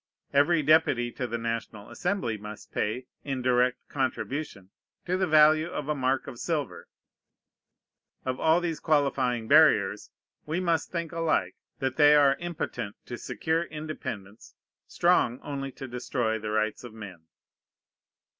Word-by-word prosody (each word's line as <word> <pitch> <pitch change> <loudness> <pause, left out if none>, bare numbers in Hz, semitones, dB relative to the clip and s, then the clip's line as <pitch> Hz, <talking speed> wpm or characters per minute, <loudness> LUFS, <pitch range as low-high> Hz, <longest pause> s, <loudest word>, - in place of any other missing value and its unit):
Every 155 +3 +4
deputy 135 -5 +3
to 125 - -4
the 115 0 -3
National 115 -2 -5
Assembly 180 - -1
must 105 0 -10
pay, 115 +5 -2 0.2
in 135 -3 -3
direct 125 0 +1
contribution, 130 -6 -3 0.3
to 180 - 0
the 185 0 +1
value 155 0 +5
of 150 -4 -5
a - - +2
mark 130 -1 0
of 120 - -9
silver. 150 -1 -3 1.4
Of 130 0 -2
all 160 +2 +3
these 165 -3 -2
qualifying 135 -6 +1
barriers 110 -10 +4 0.4
we 160 +3 -1
must 170 -3 0
think 170 -2 -3
alike: 165 -1 0 0.2
that 130 0 -2
they 150 -1 +7
are 140 -2 +5
impotent 170 -11 -4
to 120 - -6
secure 160 +6 -1
independence, 130 - -7 0.3
strong 120 +2 +2
only 135 -1 -4
to 135 - -8
destroy 120 -2 -2
the 105 0 -5
rights 110 +2 -1
of 120 -3 -10
men. 90 -7 -10
135 Hz, 140 wpm, -27 LUFS, 115-155 Hz, 1.4 s, they